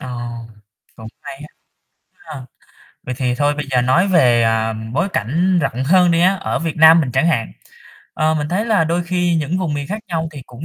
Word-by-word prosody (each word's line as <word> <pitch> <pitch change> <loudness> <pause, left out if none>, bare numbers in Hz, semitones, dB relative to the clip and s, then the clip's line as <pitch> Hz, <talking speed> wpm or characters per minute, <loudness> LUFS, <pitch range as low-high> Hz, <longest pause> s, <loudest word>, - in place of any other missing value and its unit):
Ờ, - - -8 0.9
cũng 110 -2 -10
hay - - -9
á 145 +2 -11 0.7
ha. 150 -4 -11 0.6
Vậy 125 - -5
thì 125 -2 -1
thôi 145 +2 0
bây 150 -1 -5
giờ 125 -1 +2
nói 150 +10 +2
về, 125 -10 +3
à, 115 0 0 0.2
bối 170 +7 0
cảnh 175 - 0
rộng 130 -4 -2
hơn 180 +4 +4
đi 165 0 +2
á, 185 +3 +3
ở 195 - -3
Việt 165 -1 -4
Nam 160 +1 +7
mình 135 -5 -3
chẳng 165 - +1
hạn, 130 -9 -1 0.6
ờ, 155 0 +1
mình 150 -1 -3
thấy 185 +6 -1
là 210 -7 +2
đôi 170 +2 -1
khi 175 -1 0
những 160 +3 -2
vùng 170 -6 -2
miền 145 -1 -4
khác 210 +6 -4
nhau 165 -2 -3
thì 140 -3 -9
cũng 125 +5 -11
155 Hz, 215 wpm, -18 LUFS, 130-175 Hz, 0.9 s, Nam